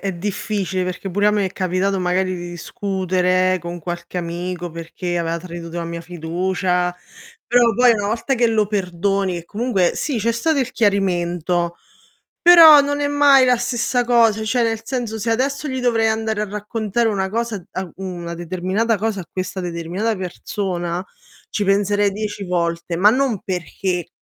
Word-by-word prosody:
è 195 -1 -2
difficile, 190 0 -2
perché 180 +2 -4
pure 205 +3 +1
a - - +6
me 205 -1 +1
è 190 - -6
capitato 185 +1 0
magari 185 +1 0
di 175 0 -6
discutere, 185 -1 0
con 175 +1 -6
qualche 175 +2 -5
amico, 175 +1 -4
perché 170 +2 -5
aveva 170 0 -1
tradito 170 -1 -8
la 170 - -3
mia 170 0 -5
fiducia, 180 +2 -1 0.5
però 240 -1 +4
poi 245 0 +5
una 205 -2 -1
volta 235 +5 0
che 235 -1 +2
lo 215 -2 +2
perdoni 195 -1 -1
e 170 - -7
comunque 205 -3 0
sì, 280 -6 -2
c'è 230 +2 +1
stato 285 +6 0
il 255 -1 -1
chiarimento, 175 -4 0 0.7
però 330 -4 +9
non 285 +1 -1
è 285 - +1
mai 285 -2 +5
la 250 -1 +4
stessa 245 +1 0
cosa, 230 -3 +3
cioè 245 +3 +1
nel 225 -1 -1
senso 235 -3 -3
se 230 +2 -2
adesso 275 +5 -1
gli 260 -1 -3
dovrei 230 -3 +2
andare 220 -1 -1
a 215 - 0
raccontare 215 +2 -1
una 190 -2 -1
cosa 225 -4 -3
a 185 - -3
uhm, 190 -1 -5
una 170 0 -5
determinata 185 +6 -1
cosa 205 -1 -2
a - - -11
questa 185 0 -4
determinata 180 +5 -2
persona, 180 -1 -3 0.5
ci 205 - -1
penserei 205 +1 +2
10 210 0 -4
volte, 170 -1 -1
ma 200 +5 +6
non 255 -4 +1
perché 180 0 -3
195 Hz, 170 wpm, -20 LUFS, 180-225 Hz, 0.7 s, però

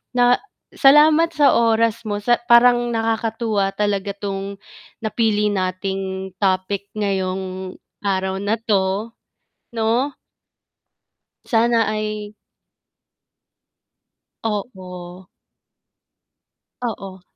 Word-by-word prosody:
Na 245 0 +4 0.3
salamat 310 +3 +5
sa 290 -2 +5
oras 230 -1 +2
mo 205 0 -2
sa 240 +1 +3
parang 240 0 +6 0.2
nakakatuwa 225 -3 0
talaga 200 -1 -1
'tong 200 0 -5 0.5
napili 210 -1 +1
nating 190 0 -3
topic 195 +1 0
ngayong 190 -2 -3 0.3
araw 190 -1 -1
na 205 +2 0
'to, 205 +1 0 0.6
'no? 235 +5 0 1.3
Sana 230 -1 +3
ay 215 0 -4 2.1
Oo. 185 -4 -6 1.5
Oo. 195 -5 -5
205 Hz, 75 wpm, -21 LUFS, 190-230 Hz, 2.1 s, parang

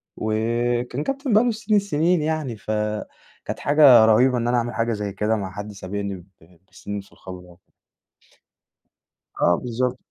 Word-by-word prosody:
وكان 120 +4 -1
كابتن 275 -3 -2
بقى 215 - +5
له 245 - +1
سنين 215 -1 0
السنين 175 -3 +1
يعني، 155 -6 -2
فكانت 105 +1 -5
حاجة 140 -6 +6
رهيبة 125 +3 +4
إن 120 - -1
أنا 120 0 +2
أعمل 120 0 -2
حاجة 115 +1 -1
زي 105 -2 -4
كده 105 +2 0
مع 95 -3 -4
حد 105 +2 -7
سابقني 100 0 -5
ب 90 -2 -13 0.5
بسنين 100 0 -6
في 95 - -22
الخبرة. 90 -1 -13 1.7
آه، 90 - +4
بالضبط. 125 +1 -2
115 Hz, 150 wpm, -22 LUFS, 105-145 Hz, 1.7 s, حاجة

